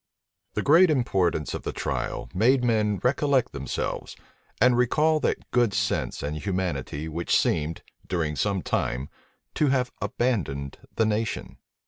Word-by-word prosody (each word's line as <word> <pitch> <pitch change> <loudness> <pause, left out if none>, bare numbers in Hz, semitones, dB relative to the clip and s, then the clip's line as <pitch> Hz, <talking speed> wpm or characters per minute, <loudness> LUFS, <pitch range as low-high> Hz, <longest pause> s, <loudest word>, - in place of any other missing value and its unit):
The 105 - 0
great 165 +5 +6
importance 95 - +1
of - - -4
the - - -3
trial - - -3
made 125 +7 +3
men 105 -4 +2
recollect 135 +1 +2
themselves, 70 -2 -4 0.4
and 125 +2 +5
recall 150 +6 +3
that - - -2
good 120 -5 +2
sense 100 -1 -1
and 75 +1 -2
humanity 80 -6 -3
which 85 +2 +1
seemed, 80 +1 0 0.2
during 80 -4 -1
some 100 +2 0
time, 65 +2 -1 0.4
to 150 - +2
have 130 -2 +1
abandoned 80 - -1 0.2
the 110 - +3
nation. 110 +1 -2
105 Hz, 135 wpm, -26 LUFS, 80-125 Hz, 0.4 s, great